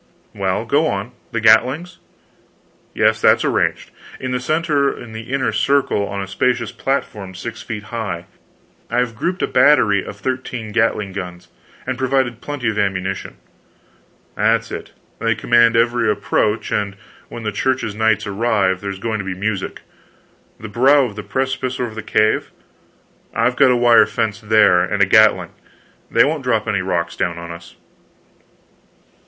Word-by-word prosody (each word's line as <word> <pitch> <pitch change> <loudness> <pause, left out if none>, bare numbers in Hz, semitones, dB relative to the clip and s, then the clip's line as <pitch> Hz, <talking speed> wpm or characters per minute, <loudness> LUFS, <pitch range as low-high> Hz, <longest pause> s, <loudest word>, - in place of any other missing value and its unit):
Well, 100 +2 -1
go 145 +7 +2
on. 100 +4 -3 0.2
The 115 - -1
gatlings?" 130 +11 +3 1.0
"Yes - - +2
that's - - +4
arranged. - - 0 0.3
In 130 -1 -4
the 125 - -1
center 150 0 +1
of 115 -4 -8
the 110 +3 -8
inner 135 -1 0
circle, 140 -7 +1
on 100 0 -4
a - - -7
spacious 115 +3 0
platform 105 -8 -3
six 110 +5 -7
feet 105 -2 -6
high, 95 -7 -4 0.6
I've 125 0 0
grouped 180 - -2
a - - +1
battery 125 -7 +4
of 100 - -9
thirteen 125 -2 -4
gatling 105 -3 0
guns, 90 -2 -7 0.4
and 130 0 -3
provided 130 -3 0
plenty 145 -4 -4
of 105 - -3
ammunition." 95 -1 -2 1.0
"That's - - +1
it. - - -7 0.3
They 115 -1 +1
command 120 +1 +3
every 120 -1 +2
approach, 105 0 0
and 100 -2 -1 0.3
when 120 - -8
the 105 - -2
Church's 130 +1 -1
knights 110 0 +1
arrive, 100 -3 0
there's 100 -1 -4
going 110 +2 -3
to - - -3
be 95 -1 -4
music. 100 0 -3 0.8
The 110 - -7
brow 135 +7 +4
of 110 -5 -7
the 105 - -5
precipice 130 +2 -2
over 120 -3 -3
the 110 - -6
cave 110 0 +1 0.4
" - - -37
"I've 125 +2 +1
got 130 - +5
a 125 - +3
wire 120 -1 +5
fence 110 -1 -2
there, 105 -4 +4
and 100 +2 +1
a - - +5
gatling. 95 -4 +4 0.6
They 115 - +5
won't 150 -1 -2
drop 115 -4 0
any 100 -3 0
rocks 85 -2 -2
down 85 -2 -2
on 85 0 -7
us." 85 0 -11
110 Hz, 160 wpm, -19 LUFS, 100-125 Hz, 1.0 s, got